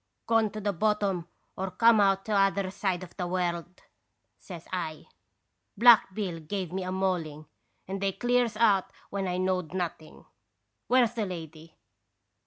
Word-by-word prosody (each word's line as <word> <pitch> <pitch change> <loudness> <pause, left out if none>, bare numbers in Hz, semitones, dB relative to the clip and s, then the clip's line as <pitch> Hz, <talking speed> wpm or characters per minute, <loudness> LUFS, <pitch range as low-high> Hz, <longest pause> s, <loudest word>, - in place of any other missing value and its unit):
" - - -52
' - - -52
Gone 225 -2 +3
to 215 - -5
the 205 -1 -1
bottom 200 -2 0 0.3
or 190 0 -3
come 230 +2 +5
out 195 -1 +2
t' 220 - -5
other 195 -1 +2
side 190 -2 -2
of 175 - -12
the 180 -2 -2
world! 175 -1 -3 0.3
' - - -50
says 175 -4 -10
I. 160 -4 -4 0.4
' 95 +3 -51
Black 230 -2 +7
Bill 185 -6 -3
give 180 +2 -4
me 190 - -2
a 185 0 -4
mauling, 175 -5 -2 0.4
and 195 +1 -4
they 195 0 +1
clears 240 +1 +1
out 205 -4 +3 0.2
when 195 -1 -2
I 180 0 -1
knowed 185 -2 -1
nothing. 170 -3 -5 0.6
Where's 245 -2 +3
the 220 -4 -2
lady?' 160 -2 -9
190 Hz, 175 wpm, -28 LUFS, 175-205 Hz, 0.6 s, Black